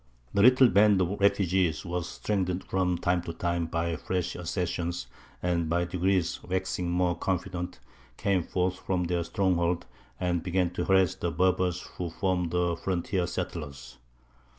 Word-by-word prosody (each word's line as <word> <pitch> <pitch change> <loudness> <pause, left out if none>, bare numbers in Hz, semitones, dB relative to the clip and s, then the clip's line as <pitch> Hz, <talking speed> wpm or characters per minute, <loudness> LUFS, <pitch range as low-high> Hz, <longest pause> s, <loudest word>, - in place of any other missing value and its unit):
The 100 - +3
little 130 +3 +7
band 105 -2 +5
of 95 +2 0
refugees 95 -4 +2
was 90 -1 -3
strengthened 95 -3 -1
from 90 -2 0
time 90 +1 +1
to 85 -1 -6
time 85 0 -1
by 85 0 -1
fresh 90 +1 -2
accessions, 90 -2 -2 0.4
and, 85 -2 0
by 85 +1 +1
degrees 90 0 0
waxing 95 -1 -2
more 90 0 +1
confident, 90 0 -3 0.4
came 95 -2 +1
forth 90 +2 -1
from 90 -2 -1
their 85 0 0
stronghold, 85 -1 0 0.3
and 90 -2 0
began 90 0 0
to 90 - -2
harass 95 -1 +4
the 90 -2 -2
Berbers 90 0 +1 0.2
who 90 -1 -2
formed 90 0 0
the 85 0 +1
frontier 90 0 -1
settlers. 80 -9 -6
90 Hz, 150 wpm, -28 LUFS, 85-95 Hz, 0.4 s, little